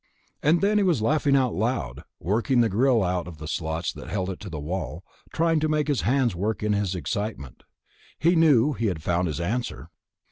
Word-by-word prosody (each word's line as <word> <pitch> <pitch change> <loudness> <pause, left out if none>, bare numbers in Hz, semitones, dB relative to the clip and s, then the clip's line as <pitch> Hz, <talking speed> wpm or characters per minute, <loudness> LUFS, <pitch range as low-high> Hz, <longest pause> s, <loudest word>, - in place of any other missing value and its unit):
And 160 +4 +3
then 210 +1 +3
he - - +3
was 165 - +2
laughing 145 +2 +2
out 130 -4 +2
loud, 110 - -2 0.2
working 120 +6 +1
the 115 - +2
grill 120 +2 +3
out 90 -1 -1
of 85 -3 -9
the 75 0 -8
slots 80 +1 -2
that - - -10
held 95 -2 -2
it 90 - -8
to 105 - -8
the 80 -3 -5
wall, 80 +1 -4 0.3
trying 165 -1 +2
to 155 +1 0
make 150 -1 +1
his 145 -4 +1
hands 125 -5 +1
work 105 +5 -2
in 105 0 +1
his 100 -2 -1
excitement. 90 - -4 0.6
He 170 +2 +3
knew 150 -4 +4
he 115 -1 -1
had 85 -6 -3
found 90 +1 +1
his 75 -1 -3
answer. 115 +8 -3
110 Hz, 210 wpm, -25 LUFS, 90-140 Hz, 0.6 s, knew